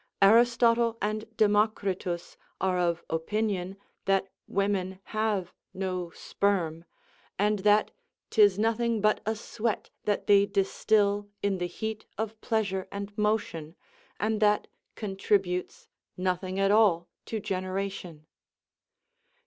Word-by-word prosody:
Aristotle 230 Hz, +2 st, +5 dB
and 215 Hz, +1 st, -2 dB
Democritus 205 Hz, -4 st, +1 dB, 0.2 s
are 185 Hz, -1 st, +1 dB
of 170 Hz, -1 st, 0 dB
opinion 195 Hz, +2 st, -2 dB, 0.3 s
that 195 Hz, 0 st, +2 dB, 0.2 s
women 190 Hz, -1 st, -1 dB
have 215 Hz, -4 st, 0 dB, 0.2 s
no 185 Hz, -2 st, -3 dB
sperm, 170 Hz, -3 st, -1 dB, 0.5 s
and 210 Hz, +1 st, +2 dB
that 210 Hz, +2 st, +3 dB, 0.4 s
'tis 205 Hz, -4 st, +5 dB
nothing 225 Hz, +1 st, +1 dB
but 215 Hz, +1 st, +3 dB
a 220 Hz, -, +1 dB
sweat 220 Hz, 0 st, -3 dB
that 205 Hz, -1 st, 0 dB
they 200 Hz, -1 st, +5 dB
distil 205 Hz, +1 st, +1 dB
in 200 Hz, -2 st, +1 dB
the 175 Hz, -, -1 dB
heat 220 Hz, +4 st, -5 dB
of 220 Hz, 0 st, -4 dB
pleasure 200 Hz, -4 st, -1 dB
and 200 Hz, 0 st, -6 dB
motion, 210 Hz, -7 st, -1 dB, 0.4 s
and 215 Hz, +1 st, 0 dB
that 210 Hz, 0 st, +3 dB, 0.3 s
contributes 195 Hz, -2 st, -1 dB, 0.3 s
nothing 185 Hz, +1 st, -1 dB
at 195 Hz, 0 st, +3 dB
all 200 Hz, -6 st, +4 dB, 0.2 s
to 220 Hz, -, -2 dB
generation. 185 Hz, -4 st, -4 dB
200 Hz, 110 wpm, -28 LUFS, 185-215 Hz, 0.5 s, Aristotle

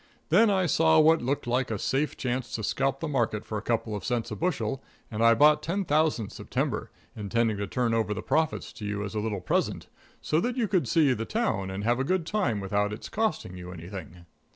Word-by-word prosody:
Then 210 Hz, +7 st, +5 dB
I 190 Hz, -2 st, +2 dB
saw 160 Hz, -1 st, +4 dB
what 160 Hz, +1 st, +5 dB
looked 135 Hz, +4 st, -1 dB
like 125 Hz, +2 st, 0 dB
a 110 Hz, -, -1 dB
safe 135 Hz, +8 st, -1 dB
chance 130 Hz, -1 st, -2 dB
to 110 Hz, -, -4 dB
scalp 135 Hz, +5 st, 0 dB
the 165 Hz, -, -2 dB
market 115 Hz, -7 st, -1 dB
for 110 Hz, -, -3 dB
a -, -, -9 dB
couple 115 Hz, -1 st, -1 dB
of 105 Hz, -, -5 dB
cents 120 Hz, -3 st, -2 dB
a -, -, -3 dB
bushel, 150 Hz, -6 st, -1 dB, 0.3 s
and 110 Hz, +1 st, -1 dB
I 115 Hz, 0 st, +6 dB
bought 150 Hz, +4 st, +5 dB
10,000 155 Hz, -, 0 dB
September, -, -, -3 dB, 0.3 s
intending 110 Hz, +1 st, 0 dB
to 100 Hz, 0 st, -3 dB
turn 120 Hz, +2 st, 0 dB
over 110 Hz, -2 st, +1 dB
the 105 Hz, -, -3 dB
profits 160 Hz, -1 st, 0 dB
to 105 Hz, -, -8 dB
you 105 Hz, 0 st, -2 dB
as 100 Hz, -, -5 dB
a 110 Hz, -, -1 dB
little 105 Hz, -3 st, -2 dB
present, -, -, -1 dB, 0.3 s
so 155 Hz, -, +1 dB
that 245 Hz, +7 st, -1 dB
you 235 Hz, -3 st, +1 dB
could 180 Hz, -, +1 dB
see 145 Hz, 0 st, +4 dB
the 115 Hz, -2 st, -3 dB
town 165 Hz, -, -1 dB
and 95 Hz, +2 st, -4 dB
have 120 Hz, +3 st, +2 dB
a -, -, +1 dB
good 180 Hz, +3 st, 0 dB
time 165 Hz, -, 0 dB
without 100 Hz, +1 st, 0 dB
it's 105 Hz, -, -7 dB
costing 200 Hz, -, -1 dB
you 90 Hz, 0 st, -8 dB
anything." 90 Hz, 0 st, -9 dB
120 Hz, 225 wpm, -27 LUFS, 105-155 Hz, 0.3 s, I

